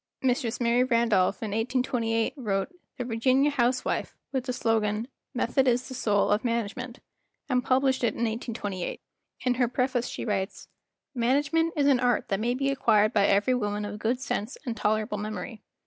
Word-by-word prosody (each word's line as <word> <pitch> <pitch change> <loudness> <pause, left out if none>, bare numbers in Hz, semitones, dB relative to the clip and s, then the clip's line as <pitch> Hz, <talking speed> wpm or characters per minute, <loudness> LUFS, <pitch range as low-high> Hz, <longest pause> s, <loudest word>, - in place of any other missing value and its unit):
Mistress 245 -3 0
Mary 240 +1 +3
Randolph, 230 -6 +2
in 215 - -3
1828, 230 0 0
wrote 205 -5 -1 0.3
"The 250 - -2
Virginia 255 +5 +2
House¬ 255 -2 +1
wife" - - -2
with 260 -2 -2
the 255 - -1
slogan 225 -2 0 0.3
"Method 260 +2 +1
is 245 0 +2
the - - -7
soul 210 -5 +1
of 210 +1 +2
Management," 235 +1 -3 0.5
and 250 -3 +1
published 260 0 +2
it 230 - +1
in - - -5
1828. 220 -5 -4 0.4
In 250 - +2
her 245 -1 +2
preface 250 0 0
she - - -5
w 210 -3 +1
T - - +1
rites: 190 +1 -7 0.5
"Management 290 +7 +1
is 290 -2 +2
an 275 -3 +4
art 245 -2 +1
that 195 -2 0
may 240 +3 0
be 275 +1 0
acquired 220 -5 +3
by 200 -2 +4
every 205 +6 +3
woman 210 -3 -1
of 205 0 -6
good 235 +3 0
sense 240 -2 -3
and 240 -3 -2
tolerable 215 0 0
memory. 215 +1 -5
235 Hz, 180 wpm, -27 LUFS, 215-255 Hz, 0.5 s, an